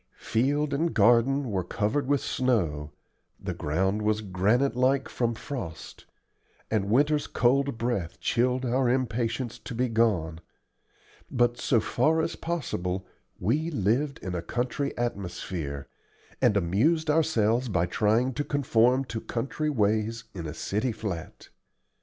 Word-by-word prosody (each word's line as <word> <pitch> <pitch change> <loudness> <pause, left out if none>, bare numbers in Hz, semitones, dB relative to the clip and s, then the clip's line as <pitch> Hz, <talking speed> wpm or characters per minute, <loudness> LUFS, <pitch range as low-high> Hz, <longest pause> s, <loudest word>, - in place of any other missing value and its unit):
Field 140 +5 0
and 160 +4 0
garden 120 +4 +4
were 95 -2 0
covered 115 +9 -1
with 145 -1 +2
snow, 85 - 0 0.5
the - - -4
ground 95 +7 0
was 105 0 +1
granite 105 +8 +1
like 130 +2 +2
from 120 -2 -1
frost, 110 - -7 0.7
and 100 -3 0
winter's 145 +5 +3
cold 135 +1 +2
breath 115 -8 -2
chilled 125 +2 +1
our 125 +1 +2
impatience 120 -1 -1
to 125 - -7
be 125 +2 +1
gone; 100 -9 +1 0.9
but 120 0 +1
so 120 - +3
far 155 +9 +2
as 160 - -1
possible 95 - -3 0.3
we 145 - 0
lived 135 - 0
in 95 - -4
a 90 - -2
country 125 +8 -2
atmosphere, 90 -10 -4 0.5
and 105 - +4
amused 120 - +2
ourselves 125 -6 +2
by 90 -4 +1
trying 110 +8 +1
to 145 - -2
conform 130 -2 +2
to 115 -3 -5
country 135 +6 -2
ways 110 -2 0
in 85 -4 -5
a 75 - -5
city 110 +5 -1
flat. 100 -7 -6
120 Hz, 135 wpm, -27 LUFS, 100-135 Hz, 0.9 s, garden